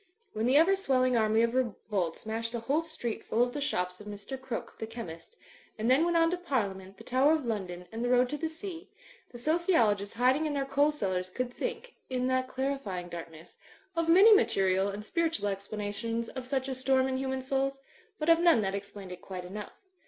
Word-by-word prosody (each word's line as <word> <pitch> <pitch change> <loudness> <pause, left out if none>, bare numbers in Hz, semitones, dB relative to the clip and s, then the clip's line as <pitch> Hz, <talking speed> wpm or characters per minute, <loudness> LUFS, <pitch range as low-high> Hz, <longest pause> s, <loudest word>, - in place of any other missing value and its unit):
When 220 +2 0
the 265 +3 +5
ever 350 +5 +6
swelling 255 -9 +2
army 220 0 +3
of 235 0 +1
revolt 210 -8 -1
smashed 230 +2 -3
a - - -1
whole 280 +7 +1
street 315 -9 -5
full 230 +2 +2
of 245 0 -2
the 290 - -3
shops 180 -8 -1
of 210 - -11
Mr. 205 +5 -6
Crooke, 260 -3 -6
the 220 - -4
chemist, 225 - -9 0.4
and 225 +3 +1
then 285 +6 +5
went 345 -1 +2
on 330 0 +4
to 360 - 0
Parliament, 200 - -3
the - - -12
Tower 265 +4 +3
of 310 -4 0
London 185 -6 -3
and 225 +1 -4
the 245 - 0
road 250 0 +4
to 295 - -3
the 320 - -1
sea, 335 +2 -8 0.4
the 240 - -10
sociologists 240 - +2
hiding 260 +6 +3
in 300 - -2
their 275 -1 0
coal 285 +2 +3
cellars 185 -10 -2
could 245 +5 -3
think 475 - -4 0.2
(in 255 -1 -1
that 255 0 +1
clarifying 260 -10 -3
darkness) 165 -1 -9 0.4
of 330 0 0
many 395 +6 +8
material 195 - +3
and 205 +1 -6
spiritual 325 -7 0
explanations 210 +3 -3
of 260 -2 -6
such 265 -1 -1
a 265 - -2
storm 260 0 +2
in 260 0 -1
human 265 0 -2
souls; 270 +1 0 0.4
but 305 - -3
of 330 0 +6
none 340 -9 +5
that 195 -1 -1
explained 200 -1 -7
it 180 0 -8
quite 185 -2 -7
enough. 210 - -8
250 Hz, 210 wpm, -30 LUFS, 205-290 Hz, 0.4 s, many